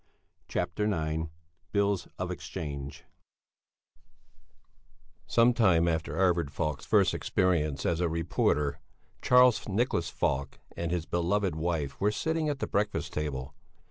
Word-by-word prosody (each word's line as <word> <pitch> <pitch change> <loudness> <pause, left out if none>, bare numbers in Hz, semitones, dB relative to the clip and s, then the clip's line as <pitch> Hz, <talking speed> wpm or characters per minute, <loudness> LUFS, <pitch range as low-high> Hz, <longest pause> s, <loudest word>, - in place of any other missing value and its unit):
CHAPTER 105 +6 -1
IX 80 -2 -1 0.5
BILLS 100 -2 +1
OF - - -3
EXCHANGE 70 -1 -6 2.2
Some 120 +1 +4
time 90 -8 +4
after 80 -2 -1
Arvid 85 -5 +2
Falk's 70 -1 -3
first - - +4
experience 75 -6 0
as 85 -1 +1
a 85 - +2
reporter 80 -3 0 0.4
Charles 125 -3 +5
Nicholas 100 -6 0
Falk 70 -2 -1 0.2
and 85 -1 -3
his 85 -1 -1
beloved 85 +2 0
wife 80 -4 -2
were 105 +1 +3
sitting 160 +6 -1
at 145 - -1
the - - -2
breakfast 105 +1 -1
table. 70 -3 -3
85 Hz, 120 wpm, -29 LUFS, 75-100 Hz, 2.2 s, Charles